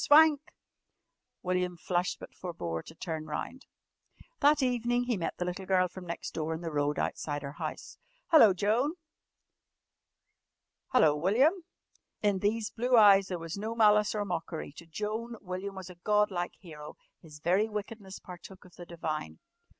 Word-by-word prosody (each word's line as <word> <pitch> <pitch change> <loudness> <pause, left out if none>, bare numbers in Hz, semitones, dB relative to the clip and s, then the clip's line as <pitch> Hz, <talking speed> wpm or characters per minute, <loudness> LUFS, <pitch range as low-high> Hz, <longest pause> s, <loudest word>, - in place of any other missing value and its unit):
"Swank!" 300 -1 +7 1.0
William 180 -1 -1
flushed 175 +1 -1
but - - -11
forbore 85 - -4
to 160 - -13
turn 160 -2 -5
round. 205 - -5 0.7
That 295 -1 +4
evening 245 -1 +1
he 245 -1 0
met 170 -4 -3
the 180 - -2
little 180 +1 -5
girl 185 -1 +3
from 180 0 -10
next 170 - -5
door 160 0 -2
in 160 - -7
the 165 -2 -4
road 145 0 0
outside 145 -1 -2
her 140 - -5
house. - - -7 0.3
"Hello, 265 -11 +8
Joan!" 220 - +1 1.9
"Hello, 155 -13 +4
William!" 215 - +4 0.7
In 205 -2 +2
these 210 +2 0
blue 245 +2 +2
eyes 200 -3 +7
there 180 - -3
was 165 +3 -6
no 220 +2 -3
malice 210 -1 +4
or 205 -1 -1
mockery. 170 -4 -4
To 170 - -11
Joan 215 +7 -4
William 190 +1 -5
was 190 -1 -8
a - - -13
god 210 -1 +3
like 175 -1 -3
hero. 150 -5 -11 0.3
His 155 -2 -13
very 190 +8 +2
wickedness 210 -2 -6
partook 180 +2 -12
of 180 - -18
the 175 - -10
divine. 155 - -4
190 Hz, 160 wpm, -30 LUFS, 170-215 Hz, 1.9 s, Hello